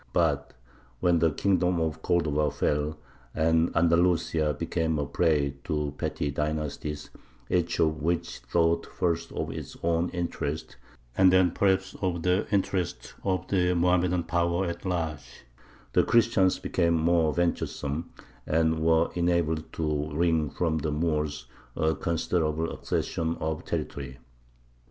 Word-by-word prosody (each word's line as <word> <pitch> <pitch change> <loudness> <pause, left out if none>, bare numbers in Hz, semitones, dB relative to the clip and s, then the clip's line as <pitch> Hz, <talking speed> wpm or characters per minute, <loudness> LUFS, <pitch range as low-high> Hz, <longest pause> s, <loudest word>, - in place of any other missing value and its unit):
But - - +1 0.4
when 85 -1 +3
the 80 0 +4
kingdom 90 +1 +1
of 80 -2 -2
Cordova 75 -4 +1
fell, 75 +1 -1 0.4
and 80 +1 +3
Andalusia 85 -2 +2
became 80 -1 -1
a 75 - -1
prey 70 -2 +1
to 75 -2 -1
petty 70 0 -2
dynasties, 75 0 -3 0.4
each 85 -1 +1
of 80 -1 +1
which 85 +2 -1
thought 80 +7 +1
first 85 -2 -1
of - - -3
its - - -7
own 85 +1 +1
interests, 85 -4 -4 0.4
and 95 -1 +6
then 95 -1 +4
perhaps 95 0 +1
of 90 -4 -1
the 90 +3 +2
interests 95 -3 -1
of 95 -2 -1
the 90 -2 +2
Mohammedan 90 0 +2
power 85 +2 0
at 85 +2 -5
large, 80 -5 -4 0.5
the - - +5
Christians 110 -5 +3
became 85 -2 +1
more 80 -1 +3
venturesome, 80 -2 -2 0.4
and 80 0 +2
were 80 +1 +3
enabled 85 -3 0
to 75 -2 -1
wring 80 -2 +2
from 80 +2 -1
the 75 - -2
Moors 75 -3 -1 0.3
a 80 +1 +1
considerable 80 -1 -1
accession 80 0 -2
of 80 +1 -3
territory. 70 -5 -4
80 Hz, 130 wpm, -27 LUFS, 75-85 Hz, 0.5 s, and